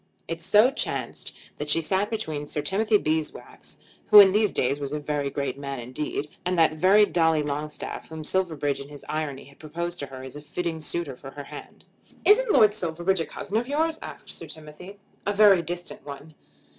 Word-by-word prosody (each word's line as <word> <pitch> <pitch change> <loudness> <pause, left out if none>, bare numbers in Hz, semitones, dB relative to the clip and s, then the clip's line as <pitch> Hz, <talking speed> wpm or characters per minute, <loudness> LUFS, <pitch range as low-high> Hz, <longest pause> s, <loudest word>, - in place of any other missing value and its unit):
It 165 0 -4
so 210 +8 +5
chanced - - -3 0.3
that 150 - -4
she 165 - +3
sat 190 +5 0
between 155 -10 -3
Sir 150 - -3
Timothy 210 +7 +2
Beeswax, 155 -4 -4 0.3
who 210 - +10
in 195 -2 +9
these 210 0 +2
days 135 +3 0
was 140 -1 -4
a 150 - -1
very 145 -1 -2
great 140 -1 -3
man 140 -2 -5
indeed, 135 +4 -4 0.2
and 180 0 -1
that 160 -1 +4
very 190 +6 +5
Dolly 160 -5 +2
Longstaff, 150 +1 -5
whom 160 -1 -7
Silverbridge 155 -6 -1
in 140 +1 -9
his 145 -1 -11
irony 150 -3 -3
had 140 +1 -18
proposed 170 +3 -5
to 140 - -4
her 130 -1 -9
as 130 +1 -9
a 150 - -8
fitting 165 +1 -4
suitor 155 -3 -3
for 135 +2 -10
her 145 +1 -8
hand. - - -11 0.4
"Isn't 480 +4 +5
Lord 210 - +6
Silverbridge 180 -1 0
a 165 - -2
cousin 205 - -4
of 240 +2 -1
yours?" 315 +3 0
asked - - -9
Sir - - -9
Timothy. 155 +6 -11 0.3
"A 205 - +2
very 200 -3 +6
distant 175 -1 -6
one." 145 +2 -9
160 Hz, 195 wpm, -25 LUFS, 145-190 Hz, 0.4 s, who